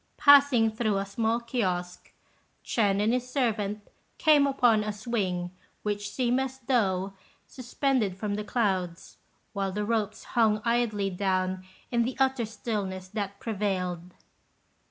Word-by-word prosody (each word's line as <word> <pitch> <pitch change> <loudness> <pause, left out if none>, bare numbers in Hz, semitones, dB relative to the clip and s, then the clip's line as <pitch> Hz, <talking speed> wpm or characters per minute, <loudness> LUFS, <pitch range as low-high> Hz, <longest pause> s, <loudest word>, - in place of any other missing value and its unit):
Passing 280 -6 +6
through 215 -2 0
a 195 - -1
small 225 +3 0
kiosque, 185 -7 -3 0.5
Ch'ên 200 -4 +1
and 215 +3 +2
his 250 0 -2
servant 215 -6 -1 0.3
came 295 -3 +5
upon 240 -6 +3
a 210 - -2
swing 195 -5 -2 0.3
which 205 -1 -2
seemed 250 0 0
as 265 0 -3
though 200 -7 0 0.3
suspended 250 -5 -1
from 205 +1 -3
the 210 +1 -2
clouds, 190 -6 -2 0.4
while 195 -2 -2
the 210 +2 -2
ropes 215 -2 -1
hung 220 -3 +2
idly 225 -4 +1
down 185 0 -1 0.3
in 235 -1 +2
the 245 +2 -2
utter 265 -4 +1
stillness 200 -4 -4
that 200 -1 -4
prevailed. 185 -6 -3
210 Hz, 135 wpm, -27 LUFS, 195-240 Hz, 0.5 s, Passing